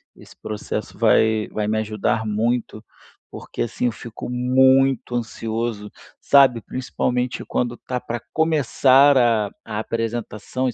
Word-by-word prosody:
esse - - -16
processo, 105 -1 -5
vai 110 -1 +3
vai 105 -1 -3
me 110 0 0
ajudar 110 +1 -1
muito. 110 +1 -1 0.5
Porque - - -7
assim, 120 +1 -2
eu 120 - +2
fico 115 0 -9
muito 130 +1 +3
ansioso, 115 -2 -4 0.3
sabe, 135 -4 +5
principalmente 125 +1 -3
quando 120 -1 -2
tá 125 -1 -4
para 120 -1 -4
começar 145 -3 +4
a 115 -5 +3
a 105 -1 -6
apresentação, 115 +2 -3
e 120 - -2
120 Hz, 130 wpm, -21 LUFS, 110-130 Hz, 0.5 s, sabe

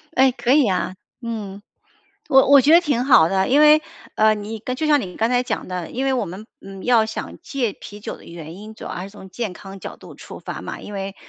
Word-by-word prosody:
哎， 265 0 +5
可 245 0 -1
以 285 -4 +4
啊， 185 0 -1 0.3
嗯。 210 -4 -6 0.7
我 265 -2 +6
我 280 -1 +8
觉 300 +4 +4
得 340 - +9
挺 285 -8 0
好 205 - +6
的， 190 +3 0
因 280 - +4
为， 305 0 +7 0.3
呃， 215 0 +4
你 215 +1 -6 0.2
就 310 - -1
像 295 -1 +5
你 180 -3 -8
刚 225 +1 +1
才 245 0 +2
讲 - - -4
的， 180 -2 -5
因 260 +3 -2
为 270 - +2
我 250 -5 0
们， 190 +5 -9
嗯， 195 -1 -10
要 235 -3 +4
想 220 - -6
戒 245 -8 -2
啤 205 0 -11
酒 - - -6
的 - - -17
原 165 -1 -9
因 215 +3 -10
主 - - -11
要 - - -6
还 180 - -5
是 195 - -8
从 195 -2 -13
健 225 0 -4
康 195 +2 -11
角 - - -8
度 - - -13
出 - - -11
发 - - -7
嘛， - - -7
因 210 - -9
为， 195 0 -5
220 Hz, 265 characters per minute, -21 LUFS, 195-260 Hz, 0.7 s, 得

